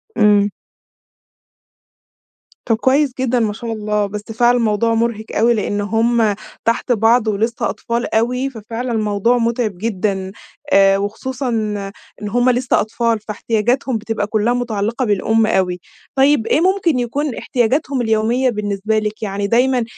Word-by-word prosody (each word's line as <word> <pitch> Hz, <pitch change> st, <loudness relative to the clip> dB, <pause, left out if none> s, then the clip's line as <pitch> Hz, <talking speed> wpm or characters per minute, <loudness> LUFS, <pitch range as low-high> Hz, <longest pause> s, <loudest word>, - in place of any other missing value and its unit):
امم. 205 Hz, -1 st, +4 dB, 2.2 s
طب 225 Hz, -, +2 dB
كويس 265 Hz, +3 st, +2 dB
جدًا 250 Hz, -1 st, +1 dB
ما 215 Hz, -2 st, 0 dB
شاء 230 Hz, +1 st, -5 dB
الله، 210 Hz, -1 st, -1 dB
بس 205 Hz, +1 st, -5 dB
فعلًا 240 Hz, +2 st, +3 dB
الموضوع 230 Hz, 0 st, +1 dB
مُرهق 225 Hz, -1 st, -1 dB
أوي 235 Hz, +2 st, +4 dB
لأن 205 Hz, -2 st, -1 dB
هم 225 Hz, 0 st, +1 dB, 0.3 s
تحت 230 Hz, +2 st, 0 dB
بعض 225 Hz, +1 st, +3 dB
ولسه 220 Hz, +3 st, -1 dB
أطفال 235 Hz, -1 st, -3 dB
أوي، 250 Hz, +4 st, +1 dB
ففعلًا 235 Hz, +1 st, -5 dB
الموضوع 215 Hz, +2 st, +1 dB
متعب 230 Hz, -4 st, -1 dB
جدًا، 195 Hz, -2 st, -2 dB, 0.4 s
آآ، 195 Hz, 0 st, +5 dB
وخصوصًا 250 Hz, +6 st, -3 dB, 0.7 s
إن 210 Hz, -, -4 dB
هم 245 Hz, +4 st, +2 dB
لسه 250 Hz, 0 st, +2 dB
أطفال 225 Hz, +1 st, -1 dB
فاحتياجاتهم 225 Hz, +4 st, -1 dB
بتبقى 215 Hz, -1 st, -3 dB
كلها 215 Hz, +3 st, +1 dB
متعلقة 235 Hz, 0 st, -1 dB
بالأم 220 Hz, +2 st, +2 dB
أوي. 185 Hz, -4 st, 0 dB, 0.4 s
طيب 270 Hz, -4 st, +3 dB
إيه 310 Hz, -, +2 dB
ممكن 365 Hz, -7 st, +2 dB
يكون 265 Hz, +3 st, -2 dB
احتياجاتهم 260 Hz, +2 st, 0 dB
اليومية 230 Hz, +3 st, +1 dB
بالنسبة 210 Hz, -1 st, -1 dB
لِك؟ 215 Hz, 0 st, -4 dB
يعني 200 Hz, -1 st, -2 dB
دايمًا 245 Hz, +2 st, +2 dB
225 Hz, 135 wpm, -18 LUFS, 210-245 Hz, 2.2 s, آآ